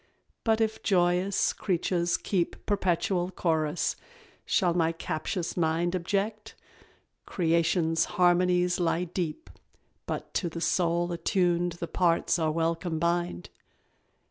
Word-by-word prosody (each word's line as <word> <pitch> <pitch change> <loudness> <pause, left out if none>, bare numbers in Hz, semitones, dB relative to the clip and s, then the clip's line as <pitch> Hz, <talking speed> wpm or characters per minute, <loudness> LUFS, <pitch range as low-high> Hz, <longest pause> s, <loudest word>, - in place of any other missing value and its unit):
But 220 -1 +2
if 220 -1 0
joyous 180 0 +2
creatures 175 -2 0
keep 180 -4 -2
Perpetual 185 -2 0
chorus, 160 -3 0 0.5
shall 180 -3 +2
my 165 -1 +2
captious 165 +2 -3
mind 170 +1 0
Object? 200 +4 -2 0.7
Creation's 165 -1 +1
harmonies 180 0 +3
lie 175 0 +1
deep, 180 - -4 0.6
But - - -5
to 175 - -1
the 165 - -6
soul 175 0 +1
attuned 175 0 +1
the 170 0 -6
parts 170 0 +1
are 160 -1 +1
well 165 +1 +1
combined. 170 - -2
175 Hz, 110 wpm, -28 LUFS, 165-180 Hz, 0.7 s, harmonies